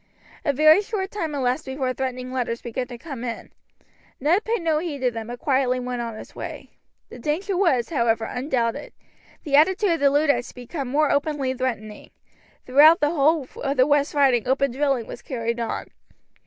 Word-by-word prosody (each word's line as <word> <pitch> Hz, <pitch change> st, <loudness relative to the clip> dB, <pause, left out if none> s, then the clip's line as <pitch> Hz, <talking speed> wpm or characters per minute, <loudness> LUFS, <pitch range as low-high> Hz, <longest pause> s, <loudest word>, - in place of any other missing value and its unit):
A 290 Hz, -, +2 dB
very 310 Hz, +6 st, +6 dB
short 400 Hz, -2 st, -4 dB
time 325 Hz, -8 st, -3 dB
elapsed 260 Hz, +2 st, -1 dB
before 265 Hz, -1 st, -2 dB
threatening 255 Hz, 0 st, -4 dB
letters 235 Hz, -2 st, -2 dB
began 250 Hz, +1 st, -4 dB
to 240 Hz, -1 st, -8 dB
come 270 Hz, -3 st, -8 dB
in. 235 Hz, -2 st, -6 dB, 0.7 s
Ned 335 Hz, +10 st, +2 dB
paid 450 Hz, -5 st, -1 dB
no 315 Hz, -2 st, +2 dB
heed 320 Hz, -3 st, -4 dB
to 250 Hz, -1 st, +2 dB
them, 225 Hz, -1 st, -6 dB
but 240 Hz, +1 st, -6 dB
quietly 260 Hz, -2 st, +1 dB
went 250 Hz, -1 st, -3 dB
on 230 Hz, -2 st, -5 dB
his -, -, -11 dB
way. -, -, -8 dB, 0.4 s
The -, -, -11 dB
danger 345 Hz, -, -2 dB
was, 330 Hz, -11 st, +2 dB
however, 230 Hz, -6 st, +1 dB
undoubted. 250 Hz, -2 st, -2 dB, 0.5 s
The 285 Hz, -4 st, +1 dB
attitude 370 Hz, +6 st, +4 dB
of 330 Hz, -, +1 dB
the 280 Hz, -, +4 dB
Luddites 285 Hz, -2 st, +2 dB
had -, -, -15 dB
become 260 Hz, +3 st, -6 dB
more 295 Hz, +3 st, +2 dB
openly 285 Hz, -2 st, 0 dB
threatening. 225 Hz, -5 st, -4 dB, 0.6 s
Throughout 300 Hz, +6 st, +7 dB
the 295 Hz, 0 st, +2 dB
whole 305 Hz, -2 st, +2 dB
of 275 Hz, 0 st, -1 dB
the 255 Hz, -, +6 dB
West 290 Hz, 0 st, +1 dB
Riding 265 Hz, -5 st, +3 dB
open 270 Hz, +1 st, +2 dB
drilling 270 Hz, -2 st, 0 dB
was 240 Hz, -, -9 dB
carried 235 Hz, -2 st, -3 dB
on. 230 Hz, -, -4 dB
270 Hz, 185 wpm, -23 LUFS, 245-305 Hz, 0.7 s, Throughout